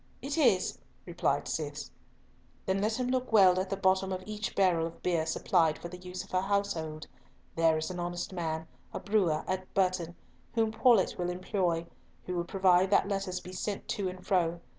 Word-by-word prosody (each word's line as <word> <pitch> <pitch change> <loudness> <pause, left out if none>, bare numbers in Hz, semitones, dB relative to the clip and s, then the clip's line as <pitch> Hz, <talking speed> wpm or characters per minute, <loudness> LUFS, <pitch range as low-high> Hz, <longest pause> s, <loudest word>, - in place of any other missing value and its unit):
"It 280 +1 -4
is," 245 - +2 0.3
replied - - -1
Cis. - - -4 0.7
"Then 190 +1 0
let 220 +3 0
him 250 0 -1
look 255 -1 -1
well 190 -4 +6
at 185 0 -2
the 195 - -2
bottom 190 0 +2
of 185 0 -3
each 210 -1 -4
barrel 175 -4 +3
of 165 - -12
beer 165 -3 +1
supplied 160 -1 +2
for 170 - -8
the 180 - -8
use 180 0 -6
of - - -17
her 185 - +2
household. 190 -6 -2 0.5
There 165 -1 +3
is 160 +3 -3
an 180 - -5
honest 175 +2 -4
man, 160 -2 -3 0.3
a - - -2
brewer, 190 -7 +1
at 185 0 -3
Burton, 180 -3 +1 0.4
whom 225 -1 +2
Paulett 220 -4 +3
will 175 0 -1
employ, 180 -2 -1 0.4
who 180 - -4
will 170 -1 -1
provide 185 0 +3
that 200 - +3
letters 195 -2 -2
be 180 +1 -10
sent 200 +2 -4
to 195 -3 -1
and 185 0 -10
fro. 175 -3 +1
185 Hz, 190 wpm, -30 LUFS, 175-200 Hz, 0.7 s, well